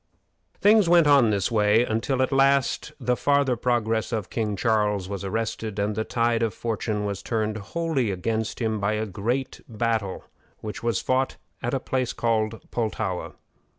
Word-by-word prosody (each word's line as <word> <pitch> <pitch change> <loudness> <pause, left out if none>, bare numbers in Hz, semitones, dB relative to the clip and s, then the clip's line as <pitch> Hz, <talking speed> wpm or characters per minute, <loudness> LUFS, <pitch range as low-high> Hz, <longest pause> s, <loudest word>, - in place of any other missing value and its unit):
Things 210 -3 +5
went 170 -2 +6
on 140 -4 +6
in - - +2
this 100 +2 0
way 110 +1 +4
until, 125 +4 0
at 130 - -1
last, 135 +1 +2
the 125 -1 +1
farther 140 -1 +2
progress 115 -2 0
of 110 -5 -3
King 110 -3 -1
Charles 105 -3 +1
was 100 0 -5
arrested, 110 +1 -3
and 105 +1 0
the 110 +2 -1
tide 115 0 0
of 115 -4 0
fortune 105 -2 -2
was 100 -2 -3
turned 110 -2 -1
wholly 135 +2 -1
against 110 +4 -2
him 110 -3 -1
by 100 +2 0
a 110 +1 -1
great 115 +7 -3
battle 110 -3 -1 0.4
which 105 -1 -6
was 115 -3 0
fought 130 +1 0 0.2
at 120 +3 -1
a - - 0
place 130 -1 -2
called 115 -1 -1
Pultowa. 110 -5 -2
115 Hz, 170 wpm, -25 LUFS, 105-125 Hz, 0.4 s, went